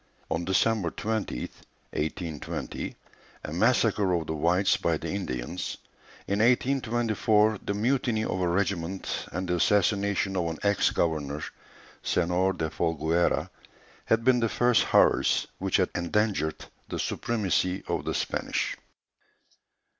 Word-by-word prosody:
On 80 +1 0
December 95 0 +2
20th, 110 +4 -3 0.4
1820, 80 0 -4 0.5
a 75 - -5
massacre 105 -1 +2
of 85 -2 -1
the 80 - -3
whites 85 +5 +2
by 85 -2 0
the - - -5
Indians; 90 -3 -4 0.5
in 100 +1 0
1824, 115 -3 +2
the 100 - -2
mutiny 120 0 +1
of 95 - -2
a 90 - +2
regiment, 95 0 -1
and 90 +2 -3
the 90 0 +1
assassination 100 +1 +2
of 90 -2 0
an 80 -1 -3
ex 100 -1 +3
governor, 75 -3 -1 0.6
Senor 90 +2 +1
de 80 -3 -3
Folgueras, 80 +1 +1 0.6
had 115 0 +2
been 125 0 +4
the 115 -1 +1
first 120 0 +3
horrors - - +3
which 95 0 +1
had 95 - +1
endangered 90 -2 0 0.2
the - - -3
supremacy 95 -5 0
of - - -1
the - - -2
Spanish. - - -1
95 Hz, 125 wpm, -27 LUFS, 85-110 Hz, 0.6 s, been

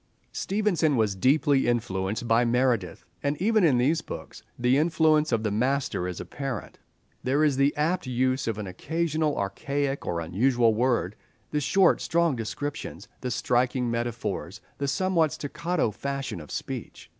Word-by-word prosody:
Stevenson 180 -8 +1
was 110 -3 +2
deeply 140 - +3
influenced 110 -2 -1
by 115 +1 +4
Meredith, 120 -6 0 0.2
and 145 +1 -1
even 215 +2 +3
in 145 -7 +4
these 145 +7 +2
books - - -8 0.2
the 125 +2 +3
influence 155 0 +3
of 115 -2 +1
the 105 - 0
master 125 -4 0
is 90 -1 -5
apparent. 135 -7 -5 0.4
There 140 +4 +2
is 150 -3 +3
the 140 +1 +4
apt 160 +1 0
use 130 +1 0
of 110 -2 -1
an 105 - -4
occasional 155 - -1
archaic 140 +8 -2
or 85 - -1
unusual 115 +7 +2
word, 115 -4 +1 0.4
the 150 - 0
short, 185 +6 +4
strong 170 -3 +2
descriptions, 140 +6 -5
the 125 - -3
striking 125 0 +1
metaphors, 115 -4 -3 0.2
the 140 - -1
somewhat 165 +1 +1
staccato 165 -2 -1
fashion 135 -4 -4
of 75 - -12
speech. - - -6
130 Hz, 150 wpm, -26 LUFS, 115-150 Hz, 0.4 s, by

